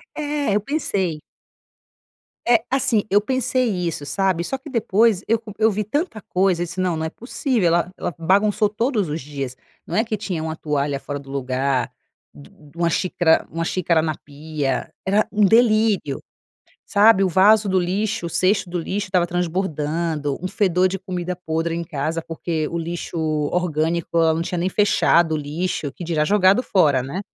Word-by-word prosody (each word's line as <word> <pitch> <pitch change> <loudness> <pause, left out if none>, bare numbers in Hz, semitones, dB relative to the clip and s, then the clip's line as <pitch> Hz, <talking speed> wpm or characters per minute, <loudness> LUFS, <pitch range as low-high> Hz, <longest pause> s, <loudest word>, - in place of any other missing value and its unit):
É. 290 -6 -1
Eu - - +3
pensei. 195 - -2 1.3
É. 235 -2 +4
Assim, 260 -5 +2
eu 205 +1 +4
pensei 255 +2 0
isso, 175 -7 -2
sabe? 175 +3 0
Só 270 - -3
que 270 +3 -12
depois 220 -4 +2
eu 230 +1 +3
co 220 -1 -10
eu 220 - +5
vi 210 +2 -1
tanta 255 - -2
coisa 185 -2 +1
e - - -2
disse: 170 +2 -7
"Não. 180 -3 0
Não 160 - -2
é - - -2
possível. 240 - -1
Ela 170 +1 +1
ela 170 - -4
bagunçou 200 +5 +2
todos 215 - -1
os 150 0 -3
dias". 135 -2 -5 0.3
Não - - -5
é 220 - +3
que 220 -2 -3
tinha 185 -6 -4
uma 160 0 -3
toalha 145 -3 -1
fora 145 0 -5
do 135 -1 -14
lugar, 130 -1 -1 0.4
du 75 - -17
uma 170 - +2
xícara 175 -1 +2
uma 165 0 -2
xícara 170 -1 +1
na 155 -1 -2
pia. 145 -2 -4
Era 205 +3 +2
um 210 -1 +3
delírio, 215 - +3 0.7
sabe? 205 -1 +5
O 190 - +3
vaso 200 +3 +5
do 185 - +2
lixo 195 +2 -1
o - - -3
cesto 185 +2 +1
do 175 - -3
lixo 200 +4 -3
estava 180 -2 +2
transbordando. 165 -4 -1
Um 185 - -2
fedor 185 -2 +2
de 195 +1 -4
comida 180 -1 -4
podre 165 -1 -2
em 170 - -3
casa 160 +1 -2
porque 160 -1 -3
o 170 - -3
lixo 170 +1 -5 0.4
orgânico 170 -1 0
ela 160 -1 +4
não 165 - -1
tinha 175 +1 -3
nem 180 +2 0
fechado 175 -5 +3
o - - +1
lixo, 150 0 -3
que - - -10
dirá 160 -3 0
jogado 200 +5 +4
fora 150 -9 +3
né. 140 +9 -5
180 Hz, 180 wpm, -21 LUFS, 160-210 Hz, 1.3 s, eu